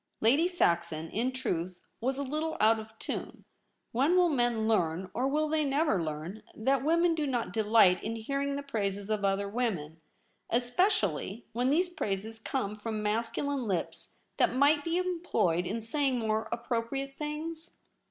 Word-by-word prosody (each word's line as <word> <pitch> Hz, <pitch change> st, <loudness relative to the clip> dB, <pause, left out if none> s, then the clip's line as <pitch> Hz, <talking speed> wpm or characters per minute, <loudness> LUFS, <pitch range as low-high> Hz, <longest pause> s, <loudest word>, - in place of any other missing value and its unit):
Lady 275 Hz, +10 st, +4 dB
Saxon, 170 Hz, -, 0 dB
in 240 Hz, +4 st, 0 dB
truth, 185 Hz, -9 st, -3 dB, 0.2 s
was 260 Hz, +3 st, -1 dB
a 280 Hz, -, -1 dB
litde 310 Hz, +4 st, -2 dB
out 220 Hz, +1 st, +5 dB
of 220 Hz, 0 st, -11 dB
tune. -, -, -5 dB, 0.5 s
When 275 Hz, +9 st, +3 dB
will 360 Hz, -1 st, +5 dB
men 240 Hz, -6 st, +1 dB
learn, 185 Hz, -4 st, +1 dB
or 255 Hz, +3 st, 0 dB
will 305 Hz, +3 st, +1 dB
they 310 Hz, 0 st, +1 dB
never 280 Hz, -, +2 dB
learn, 160 Hz, +6 st, -5 dB
that 265 Hz, +4 st, +1 dB
women 335 Hz, +3 st, +3 dB
do 305 Hz, -2 st, -1 dB
not 245 Hz, -4 st, -2 dB
delight 215 Hz, -4 st, +4 dB
in 225 Hz, -, -2 dB
hearing 275 Hz, +5 st, -2 dB
the 285 Hz, -, -4 dB
praises 205 Hz, -6 st, -2 dB
of 210 Hz, -1 st, 0 dB
other 195 Hz, 0 st, +1 dB
women; 190 Hz, -9 st, -2 dB, 0.5 s
espe 245 Hz, -, +3 dB
cially 205 Hz, -, -1 dB
when 245 Hz, +3 st, +1 dB
these 340 Hz, +6 st, +3 dB
praises 220 Hz, -, -3 dB
come 220 Hz, -3 st, -2 dB
from 215 Hz, 0 st, -4 dB
masculine 230 Hz, +5 st, -1 dB
lips 185 Hz, -4 st, -3 dB, 0.2 s
that -, -, +3 dB
might 290 Hz, +2 st, +4 dB
be 335 Hz, +2 st, 0 dB
employed 330 Hz, -, 0 dB
in 225 Hz, +3 st, -2 dB
saying 265 Hz, +3 st, 0 dB
more 220 Hz, -1 st, -1 dB
appropriate 240 Hz, +3 st, -2 dB
things 315 Hz, +2 st, -5 dB
235 Hz, 160 wpm, -30 LUFS, 210-285 Hz, 0.5 s, out